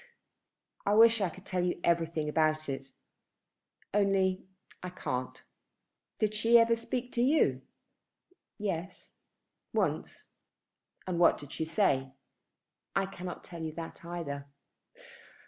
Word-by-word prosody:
"I 205 - +2
wish 230 0 +7
I 190 - +2
could 190 +3 -13
tell 180 -2 -1
you 180 -1 -1
everything 165 -2 +1
about 155 0 +1
it; 135 0 -4 1.1
only 195 -2 +2 0.3
I 180 - -5
can't. 130 -8 -4 0.7
Did 215 -1 +1
she 225 +2 +5
ever 230 0 +5
speak 245 +2 -4
to 235 - 0
you?" 280 +6 +3 1.0
"Yes, 190 -3 -4 0.6
once." - - -1 0.8
"And 180 -2 -2
what 175 - +6
did 145 - -11
she 160 - -2
say?" 135 -7 +1 0.8
"I 195 - +2
cannot 180 -2 -7
tell 170 -2 -9
you 160 -1 -4
that 165 +1 -8
either." 155 -5 -5
180 Hz, 120 wpm, -31 LUFS, 160-205 Hz, 1.1 s, wish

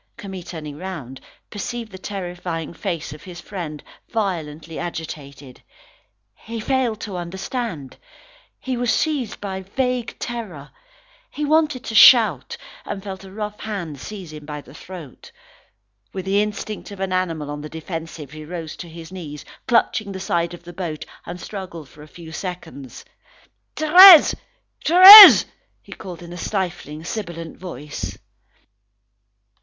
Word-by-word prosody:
Camille 195 -4 -8
turning 155 -4 -8
round, 155 -9 -8 0.3
perceived 225 +2 -6
the 190 - -9
terrifying 175 -4 -6
face 170 -5 -5
of 150 - -12
his 175 0 -10
friend, 165 -7 -7 0.3
violently 165 -7 -4
agitated. 145 -6 -8 0.7
He 230 +1 -8
failed 245 -2 -1
to 195 -4 -6
understand. 180 - -6 0.6
He 260 -1 -4
was 245 -1 0
seized 285 -9 -1
with 190 -1 -6
vague 250 -3 -1
terror. 190 -12 -7 0.6
He 300 - -4
wanted 300 -4 +1
to 225 - -6
shout, 240 - +6 0.3
and 195 - -6
felt 195 -1 -8
a 190 - -12
rough 210 +1 -6
hand 175 -10 -6
seize 185 -2 -9
him 150 -1 -10
by 150 0 -7
the - - -17
throat. 175 -8 -12 0.8
With 190 -1 -6
the 200 +1 +2
instinct 210 0 -5
of 200 -2 -10
an 190 -1 -2
animal 165 -5 -2
on 145 0 -6
the 150 - -8
defensive, 160 -3 -7
he 155 0 -10
rose 165 0 -7
to 175 - -9
his 165 +1 -11
knees, 155 -6 -9 0.2
clutching 230 -4 +1
the 190 - -6
side 170 -2 -2
of 175 - -17
the 175 0 -11
boat, 165 -4 -5 0.2
and 175 +1 -7
struggled 180 -8 -8
for 150 - -17
a 150 - -12
few 165 +1 -12
seconds. 165 -7 -8 0.7
"Thérèse! 345 +2 +9 0.5
Thérèse!" 385 +4 +11 0.4
he - - -17
called 175 -2 -9
in 170 0 -10
a - - -8
stifling, 175 -6 -4
sibilant 170 -4 -6
voice. 150 -5 -7
180 Hz, 145 wpm, -21 LUFS, 160-215 Hz, 0.8 s, Thérèse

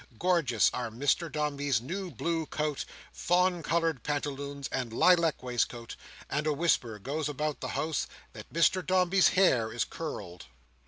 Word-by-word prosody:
Gorgeous 165 - +3
are 120 -2 -3
Mr 145 +8 0
Dombey's 145 -5 0
new 180 - -5
blue 165 +3 -2
coat, 150 -2 -2 0.3
fawn 180 0 +2
coloured 165 -5 0
pantaloons, 140 -1 -3
and 125 -3 -3
lilac 170 +4 +3
waistcoat; 120 -1 -2 0.3
and 150 +2 -1
a 155 - +2
whisper 140 -8 +1
goes 145 +8 -3
about 150 +1 -2
the - - -4
house, 155 -2 -1 0.3
that - - -11
Mr 170 +3 +3
Dombey's 185 0 +4
hair 125 -13 +3
is - - -1
curled. 90 0 -7
150 Hz, 145 wpm, -30 LUFS, 130-170 Hz, 0.3 s, Dombey's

